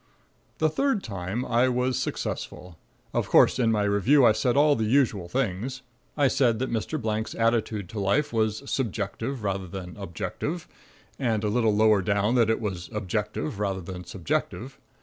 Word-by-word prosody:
The 155 - +3
third 245 - 0
time 100 +3 -4
I 120 +2 +3
was 125 +1 0
successful. 90 -5 -4 0.3
Of - - -1
course - - +5
in 115 -2 +3
my 105 -2 +1
review 105 +7 +4
I 110 - +7
said 115 +4 +1
all 145 0 +5
the 110 - -1
usual 110 -7 +2
things. 125 +4 -2 0.3
I 145 -2 +4
said 120 -4 +2
that 130 +3 -2
Mr. 115 +7 -2
Blank's 110 -2 -2
attitude 115 -3 0
to 110 -1 -5
life 100 +9 +1
was 110 +1 0
"subjective 115 0 -3
rather 95 -2 -2
than 90 0 -7
objective"... 125 - -4 0.5
and 115 -5 0
a 105 - +1
little 110 -1 +2
lower 105 -1 +4
down 100 +4 +1
that 120 -3 +3
it 110 - +2
was 90 -5 -4
"objective 100 -3 -3
rather 100 -2 -1
than 90 +1 -7
subjective." 90 -1 -3
110 Hz, 170 wpm, -26 LUFS, 100-125 Hz, 0.5 s, I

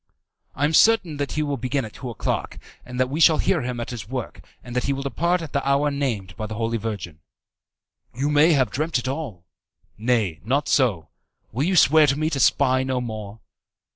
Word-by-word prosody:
"I 145 - +1
am 155 - 0
certain 185 -5 +4
that 145 0 -3
he 155 - 0
will 145 -2 -2
begin 130 0 -2
at 110 - -10
two 125 - -7
o'clock, 115 - -3 0.3
that 125 +1 -1
we 145 +5 -4
shall 160 -1 +6
hear 175 -5 +1
him 125 -1 -4
at 120 - -5
his 110 -5 -7
work, 130 -3 -5 0.2
and 120 0 -9
that 125 - 0
he 140 - +1
will 135 0 -4
depart 170 +7 0
at 155 - -9
the 140 - 0
hour 140 +2 +2
named 115 -10 -3
by 110 - -5
the 110 - -6
Holy 115 +1 -1
Virgin." 100 -8 -5 0.9
"You 140 +5 -2
may 150 +3 +5
have 130 -7 +2
dreamt 155 +3 -1
it 125 - -4
all." 130 - -5 0.5
"Nay, 110 -8 0
not 140 +7 0
so. 105 - +1 0.4
Will 130 +7 -1
you 185 +2 +1
swear 155 -1 +6
to 140 0 +1
me 155 +1 -1
to 140 - -1
spy 130 0 +3
no 130 -1 -1
more?" 110 -3 -7
130 Hz, 210 wpm, -23 LUFS, 115-145 Hz, 0.9 s, shall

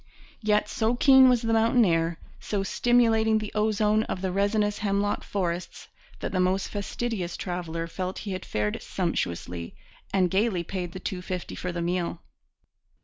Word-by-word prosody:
Yet 210 -1 +2
so 230 -2 0
keen 265 0 +7
was 245 -1 +2
the 225 0 +1
mountain 225 +1 +4
air, 165 -1 +1 0.2
so 200 -2 -2
stimulating 225 0 +3
the 215 -1 -4
ozone 215 0 +2
of 185 - -4
the 190 - 0
resinous 205 +2 +1
hemlock 205 0 0
forests, 175 -3 -3 0.3
that - - -3
the 185 - 0
most 185 +1 +1
fastidious 205 -3 -3
traveller 170 -2 -3
felt 185 +2 -4
he 200 - -3
had 185 0 -4
fared 105 0 -2
sumptuously, 85 - -3 0.4
and 185 -3 +2
gaily 195 -3 +1
paid 180 -1 -5
the 185 - -6
two 185 0 -4
fifty 180 -1 -5
for 180 - -4
the 170 -1 -3
meal. 175 -1 -1
195 Hz, 160 wpm, -27 LUFS, 175-215 Hz, 0.4 s, keen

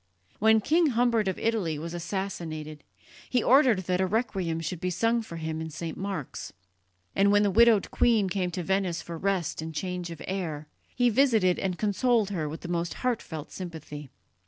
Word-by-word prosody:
When 220 +1 +5
King 325 +8 +3
Humbert 235 -4 +2
of 190 - -1
Italy 205 -9 0
was 165 +3 -6
assassinated 165 -4 -5 0.5
he 250 -2 +2
ordered 255 -6 +5
that 180 0 0
a 190 - +2
requiem 190 -6 -1
should 165 +1 -4
be 185 - 0
sung 230 +6 +1
for 220 -7 -9
him 160 -1 -4
in 160 - -4
St. 160 +1 -5
Mark's; 190 -8 -5 0.6
and 200 +1 +4
when 205 0 +5
the 200 - +2
widowed 225 0 +5
queen 225 -5 +3
came 185 -1 -1
to 175 +1 -4
Venice 190 -1 0
for 170 - -7
rest 185 -2 -1
and 160 0 -6
change 180 +1 -3
of 165 - -8
air, 165 -6 -3 0.3
he 245 -1 +3
visited 220 -8 +3
and 185 -2 -2
consoled 215 0 +1
her 160 -6 -2
with 160 - -7
the - - -7
most 170 -1 -2
heartfelt 160 -11 -2
sympathy. 155 -5 -8
185 Hz, 180 wpm, -27 LUFS, 165-220 Hz, 0.6 s, When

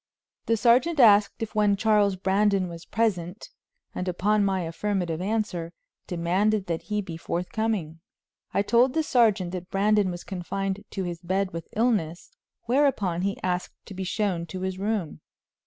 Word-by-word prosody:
The 230 - +2
sergeant 245 +9 +3
asked 210 -2 +5
if 220 - -6
one 210 -2 +3
Charles 205 -2 +3
Brandon 195 0 +1
was 170 0 -9
present, 195 -4 -2 0.4
and 180 - -4
upon 205 +4 +1
my 190 -2 +1
affirmative 175 -1 -2
answer 185 -5 -2 0.3
demanded 185 +4 +1
that 165 -2 -2
he 210 -1 -1
be 170 -4 -7
forthcoming. 175 -1 -2 0.5
I 200 - +1
told 245 +5 +3
the 320 - +2
sergeant 215 -10 +2
that 180 0 -6
Brandon 205 0 +2
was 175 -1 -6
confined 195 +1 -4
to 195 - -4
his 175 -2 -5
bed 190 +2 -1
with 165 -1 -6
illness, 210 -8 0 0.3
whereupon 235 -9 +1
he 200 +1 -1
asked 180 -1 -2
to 205 - -9
be 190 0 -4
shown 185 -3 -1
to 185 +3 -6
his 190 0 -3
room. 200 -5 -2
195 Hz, 155 wpm, -26 LUFS, 180-215 Hz, 0.5 s, asked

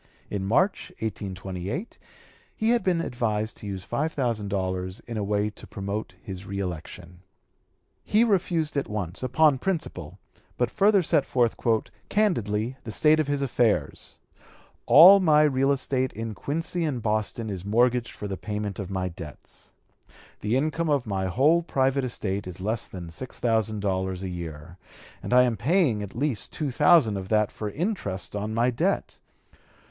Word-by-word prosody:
In 95 -1 -2
March, 180 - +1
1828, 95 - -5 0.6
he 220 +1 +1
had 240 - +3
been 180 -3 +1
advised 110 -6 -2
to 105 - -8
use 95 -2 -5
five 145 +10 -1
thousand 120 -8 -1
dollars 95 -1 -2
in 115 - -8
a 105 - -1
way 105 +1 0
to - - -13
promote 100 +2 -5
his 95 -1 -8
reëlection. 90 -2 -6 0.9
He 215 +2 +3
refused 175 -8 +1
at 140 - -1
once, 100 -4 -4
upon 135 +2 +3
principle; 175 0 -3 0.4
but - - 0
further 200 -2 +4
set 145 - +2
forth 120 -4 +1 0.5
"candidly, 120 - 0
the 115 - -8
state 155 +6 +4
of 155 - +1
his 145 -1 0
affairs:" 120 -4 0 0.7
"All 185 +7 +10
my 155 -5 +5
real 135 -2 +2
estate 130 -1 0
in 110 0 -5
Quincy 165 - -2
and 145 -6 -1
Boston 110 +1 -1
is 95 -3 -5
mortgaged 120 +3 +2
for 105 - -6
the 100 - -3
payment 105 -2 -4
of 95 -2 -5
my 95 -1 -2
debts; 85 -4 -11 0.7
the 110 +4 0
income 155 +3 0
of 140 -4 +1
my 95 -3 -1
whole 145 - +3
private 135 -4 +1
estate 100 -6 -3
is 90 0 -8
less 110 +4 -2
than 85 -3 -8
$6,000 105 -3 -1
a 95 - -3
year, 85 -1 -7 0.4
and - - -6
I 125 0 +7
am 120 -2 +1
paying 140 - +2
at 100 -1 -7
least 135 -3 -1
two 150 -4 -3
thousand 145 - +5
of 95 -1 -6
that 105 -1 +2
for 105 - -5
interest 105 - -3
on 105 +2 -3
my 120 +2 +2
debt. 115 - -1
115 Hz, 160 wpm, -26 LUFS, 100-145 Hz, 0.9 s, All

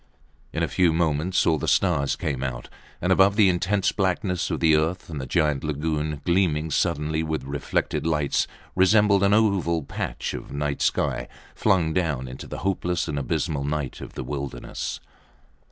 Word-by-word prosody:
In - - -1
a - - +1
few 90 -3 +3
moments 80 +2 +1
all 80 -2 +3
the - - -3
stars 70 0 +2
came 70 -4 -3
out 60 -2 -4 0.3
above 95 +2 +4
the 105 -3 +5
intense 95 +3 +1
blackness 95 -2 0
of - - -2
the 80 -2 +5
earth 80 +3 -1
and 75 -3 -4
the 65 - -6
great 75 -1 +1
lagoon 75 0 -2
gleaming 85 -4 +1
suddenly 75 +2 0
with 80 -1 -2
reflected 70 +3 -2
lights 75 -3 +1 0.3
resembled 100 +1 +4
an 100 +1 +4
oval 95 -7 +2
patch - - -4
of - - -7
night 70 0 -2
sky - - 0 0.3
flung 80 -4 +2
down 75 -8 -1
into 65 +1 -8
the - - -6
hopeless 90 -3 0
and 75 -3 -2
abysmal 75 0 -1
night 75 -2 -3
of - - -8
the - - -4
wilderness. 70 -4 -5
80 Hz, 165 wpm, -25 LUFS, 75-90 Hz, 0.3 s, the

